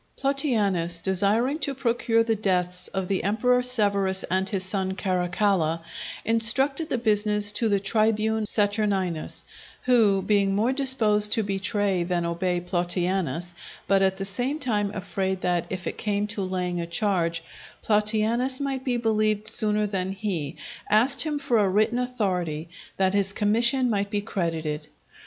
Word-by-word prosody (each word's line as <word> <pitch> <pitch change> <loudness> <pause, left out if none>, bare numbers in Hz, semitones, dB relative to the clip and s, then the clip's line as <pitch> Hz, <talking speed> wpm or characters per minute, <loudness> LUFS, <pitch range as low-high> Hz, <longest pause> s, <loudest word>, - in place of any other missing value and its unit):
Plautianus, 210 - +1
desiring 210 - +1
to 280 -3 -2
procure 235 -3 +1
the 225 -1 0
deaths 180 -3 -1
of 190 -2 -4
the 195 0 -1
Emperor 250 +5 +1
Severus 200 -6 +1
and 190 +1 0
his 195 -4 -1
son 190 0 -1
Caracalla, 180 -3 0 0.4
intrusted 265 +7 +3
the - - -1
business 210 -2 +1
to 225 +1 0
the 200 -1 +2
tribune 220 +1 0
Saturninus, 205 -6 0 0.4
who, 215 -6 +3
being 200 -2 +1
more 230 +6 +1
disposed 220 -7 +3
to 225 - +1
betray 195 -1 -1
than 175 0 -2
obey 175 +1 -1
Plautianus, 175 -2 -1 0.3
but 195 -1 +3
at 190 0 +1
the 195 - -4
same 245 +9 -1
time 215 -8 -1
afraid 190 -1 -3
that, 175 -1 -1
if 185 -1 -6
it - - -5
came 205 -1 -1
to 210 -1 -4
laying 180 -2 -3
a 170 - -5
charge, 170 -3 -1 0.4
Plautianus 220 +4 +2
might 270 -2 -3
be 250 -3 -1
believed 215 -2 0
sooner 215 -2 +2
than 190 -2 -3
he, 190 -8 -3 0.3
asked 240 +7 +5
him 305 -2 0
for 275 -5 0
a 200 -2 +2
written 215 +5 +1
authority, 180 -11 -3 0.3
that 190 0 +1
his 200 -1 +2
commission 235 +5 +2
might 200 -3 -1
be 205 0 -2
credited. 165 -7 -3
205 Hz, 150 wpm, -24 LUFS, 185-225 Hz, 0.4 s, asked